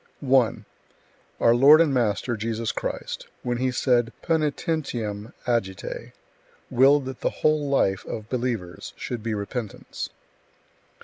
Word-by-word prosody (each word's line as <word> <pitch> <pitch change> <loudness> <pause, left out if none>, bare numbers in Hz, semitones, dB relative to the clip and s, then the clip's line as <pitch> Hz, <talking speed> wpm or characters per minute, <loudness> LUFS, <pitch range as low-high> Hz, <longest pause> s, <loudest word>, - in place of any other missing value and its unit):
1. 130 -4 +2 0.7
Our 115 - +5
Lord 140 +6 +8
and 160 -4 +4
Master 120 0 +1
Jesus 115 +1 -2
Christ, - - -4 0.2
when 120 -1 -1
He 130 0 +1
said 120 -2 +2
Poenitentiam 145 -9 -1
agite, 105 -7 -2 0.6
willed 135 +2 +5
that 130 -1 -7
the - - +2 0.2
whole 155 -2 +3
life 95 -8 +2
of 110 -1 -5
believers 115 -8 -3
should 120 -2 -5
be 115 0 -2
repentance. 105 +1 -5
120 Hz, 120 wpm, -25 LUFS, 110-135 Hz, 0.7 s, Lord